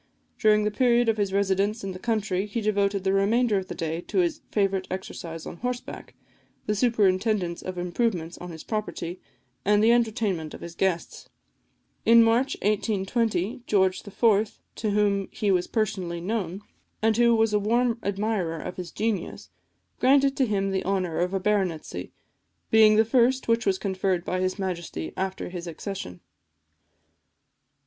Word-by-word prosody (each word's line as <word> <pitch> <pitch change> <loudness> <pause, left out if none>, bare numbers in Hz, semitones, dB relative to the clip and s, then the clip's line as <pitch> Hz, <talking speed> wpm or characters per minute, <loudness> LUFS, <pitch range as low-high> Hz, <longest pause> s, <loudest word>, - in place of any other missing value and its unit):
During 215 -1 +4
the 210 - 0
period 240 +1 +3
of 220 - +1
his 200 -2 0
residence 200 +2 +1
in 195 - -3
the 185 - -8
country, 210 -3 -1
he 210 +3 -3
devoted 200 -2 0
the 190 0 +1
remainder 210 +2 +2
of 185 - -7
the - - -6
day 165 -1 -3
to - - -3
his 345 -3 +1
favourite 195 -2 0
exercise 170 -3 -6
on - - -7
horseback, 250 +2 -5 0.5
the 210 - 0
superintendence 200 -5 +1
of 185 -1 -6
improvements 175 -1 -1
on 180 - -7
his 160 -2 -9
property, 195 -5 -4 0.4
and 210 +1 +3
the 225 - +6
entertainment 220 -9 0
of - - -12
his 170 - -7
guests. 185 -1 -2 0.7
In 230 0 +7
March 235 +4 +2
1820, 210 +1 0
George 190 -2 +2
IV., 210 0 +1 0.2
to 220 - -1
whom 200 -1 +1
he 205 -2 -1
was 180 -2 +1
personally 190 -6 -2
known, 190 0 -3 0.4
and 220 0 +3
who 235 -1 +5
was 220 -1 +2
a 210 - +3
warm 230 +3 +1
admirer 200 -4 -1
of 180 - -6
his 180 -2 -5
genius, 210 -3 -3 0.5
granted 275 +1 +4
to 265 - +2
him 195 -2 0
the 190 - -1
honour 185 -3 -1
of 180 +1 0
a - - +1
baronetcy, 190 -5 -1 0.6
being 220 -1 +7
the 220 +1 +5
first 255 +3 +2
which 230 -1 +1
was 190 -1 +3
conferred 190 -2 -1
by 185 - -1
his 185 +1 -1
Majesty 170 - -4
after 190 0 -3
his 175 -1 -6
accession. 165 - -6
200 Hz, 160 wpm, -26 LUFS, 185-225 Hz, 0.7 s, In